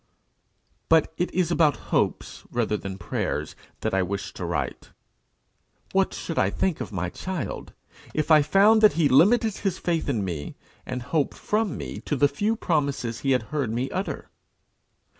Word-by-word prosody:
But 160 -1 +4
it 175 - -1
is 175 -2 0
about 160 -4 +4 0.2
hopes - - 0
rather 115 -3 0
than 95 -2 -5
prayers 85 - -3 0.3
that - - -1
I 95 - +3
wish 100 +2 -3
to - - -5
write. - - -3 1.0
What - - +2
should - - -3
I 95 - +3
think 180 - -1
of - - -5
my 90 -3 -3
child, 180 - -5 0.4
if 155 +1 -1
I 155 -1 +8
found 200 +8 +5
that 215 - +7
he 165 -3 +3
limited 210 - +4
his 190 -3 -1
faith 165 -4 -1
in 110 -7 0
me 80 -6 -5 0.3
and 125 -1 -4
hope 140 +2 0
from 210 -2 -1
me - - -6
to 150 - -2
the 145 +1 +4
few 205 +11 0
promises 140 - -1
he 135 - -2
had 125 -3 +1
heard 140 -6 0
me 125 +4 -2
utter! 190 +3 -4
145 Hz, 170 wpm, -25 LUFS, 115-180 Hz, 1.0 s, I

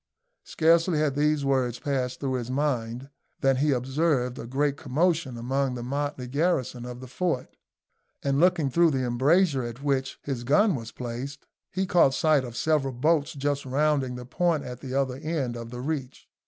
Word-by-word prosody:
Scarcely 165 +1 +3
had 150 -2 +1
these 150 0 +1
words 130 -3 +1
passed 130 -2 -2
through 135 -2 -2
his 125 -2 -3
mind 130 -2 -2 0.3
than 135 -1 +3
he 145 +2 +2
observed 130 0 0
a 115 - -6
great 140 +3 0
commotion 145 -1 0
among 130 +2 -1
the 120 - -5
motley 140 0 -3
garrison 130 -4 0
of 125 0 -8
the 130 - -8
fort, 130 0 -2 0.7
and, 140 0 +1
looking 170 -5 +3
through 170 +4 +5
the 130 -3 0
embrasure 140 +5 +3
at 120 +2 -6
which 135 -2 0
his 130 -4 -3
gun 185 - +4
was 115 -4 -5
placed, 125 +3 -6 0.3
he 190 +1 -1
caught 170 -7 +4
sight 155 -4 +3
of 120 -2 -7
several 150 -4 +1
boats 150 +3 +2
just 140 0 -1
rounding 135 -1 +1
the 125 0 -7
point 165 +3 0
at 125 -1 -7
the 130 0 -6
other 130 -2 0
end 140 -5 -2
of 115 -1 -7
the 125 +1 -6
reach. 140 -2 -4
135 Hz, 180 wpm, -26 LUFS, 125-150 Hz, 0.7 s, through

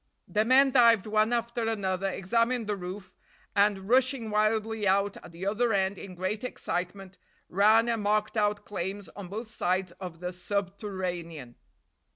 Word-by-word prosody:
The 215 0 +1
men 265 +4 +5
dived 230 -5 +5
one 215 +1 +2
after 235 -1 -1
another, 195 -3 -1
examined 230 +5 0
the 210 0 -1
roof, 190 +1 -8 0.4
and, 200 -1 +2
rushing 255 -1 +2
wildly 215 0 +1
out 200 +1 +2
at - - -12
the 170 +3 -7
other 225 +3 +1
end 195 0 0
in 185 -2 -9
great 190 +5 -3
excitement, 185 -4 -4 0.3
ran 215 +5 +4
and 230 -2 0
marked 210 +1 0
out 210 -1 0
claims 195 0 -5
on 200 -2 -9
both 215 +5 -6
sides 185 -3 -1
of 180 -4 -7
the 180 +1 -4
subterranean. 180 - -4
205 Hz, 155 wpm, -28 LUFS, 185-225 Hz, 0.4 s, men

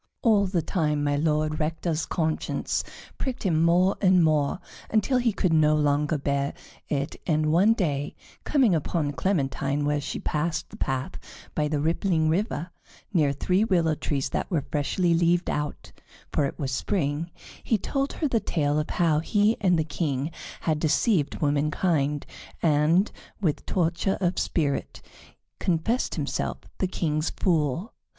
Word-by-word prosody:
All 210 -4 +4
the 180 -3 0
time 150 -4 0
My 145 0 +1
Lord 155 0 0
Rector's 160 +1 -1
conscience 160 -2 -1 0.4
pricked 260 -2 -3
him 165 -5 +2
more 175 +3 +3
and 185 -3 +5
more, 155 0 +2 0.3
until 225 +4 +2
he 240 -2 +2
could 185 -4 0
no 155 -1 +4
longer 150 +1 +1
bear 140 0 -1 0.3
it, 140 -1 -2
and 155 -2 +2
one 195 +7 +5
day, 145 -9 -2 0.3
coming 265 -9 +3
upon 155 -1 0
Clementine 140 -4 -1
where 145 0 +1
she 145 - -4
passed 160 +2 -2
the - - -9
path 130 0 -3 0.3
by 150 -1 0
the 150 -1 -1
rippling 160 +1 +1
river, 180 -1 -1 0.4
near 150 -6 +3
three 180 +8 +1
willow 170 -7 +2
trees 140 -2 -2
that - - -2
were 160 -7 -1
freshly 170 +4 +1
leaved 170 +1 +2
out, 150 0 -4 0.4
for 145 - +2
it 140 - -4
was 135 -4 -3
spring, 150 +1 -1 0.3
he 225 - +2
told 275 +7 -2
her 310 - -1
the 235 -4 +1
tale 150 -6 0
of 150 - -3
how 165 -4 +2
he 205 +7 +2
and 180 -4 +3
the 160 - +2
King 145 -1 -2 0.3
had 155 -2 0
deceived 155 - +1
womankind, 150 0 +1 0.4
and, 160 +5 +3 0.3
with 165 -8 -1
torture 175 +2 0
of 180 -1 0
spirit, 145 -5 -1 0.6
confessed 185 +9 0
himself - - -2 0.2
the 190 - +1
King's 155 -3 -1
Fool. 165 - 0
160 Hz, 150 wpm, -26 LUFS, 150-185 Hz, 0.6 s, and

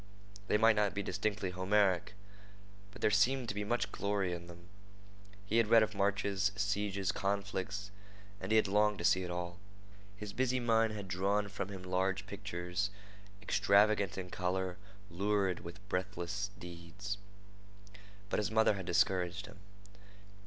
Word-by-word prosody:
They 105 - +3
might 110 +1 +5
not 105 -3 +1
be 100 - -1
distinctly 100 -1 -1
Homeric, 95 +1 +2 0.7
but 100 - -12
there - - +4
seemed 120 +5 +3
to - - -1
be 105 0 -2
much 105 -2 -1
glory 100 -3 -1
in 85 0 -6
them. 85 0 -13 0.8
He 110 +3 +1
had 115 -2 +4
read 115 0 +7
of 110 0 -2
marches, 100 0 +1
sieges, 100 -2 0
conflicts, 100 0 -2 0.5
and 95 +2 -5
he - - +5
had 110 - +5
longed 105 +1 +3
to 85 - -5
see 90 - +4
it 90 - -4
all. 90 0 -4 0.6
His 105 -1 -6
busy 130 0 +1
mind 115 -2 +3
had 100 -2 -6
drawn 100 +3 +1
for 100 - -4
him 95 -2 -7
large 95 +1 0
pictures 100 -2 -3 0.5
extravagant 100 -1 +3
in 90 -1 -5
color, 90 0 -1 0.3
lurid 100 0 +1
with 85 +4 -10
breathless 95 +1 -2
deeds. 90 +4 -7 1.1
But - - +2
his 105 0 0
mother 110 0 +4
had 95 -3 -6
discouraged 90 +1 +1
him. 100 - -13
100 Hz, 150 wpm, -34 LUFS, 95-105 Hz, 1.1 s, read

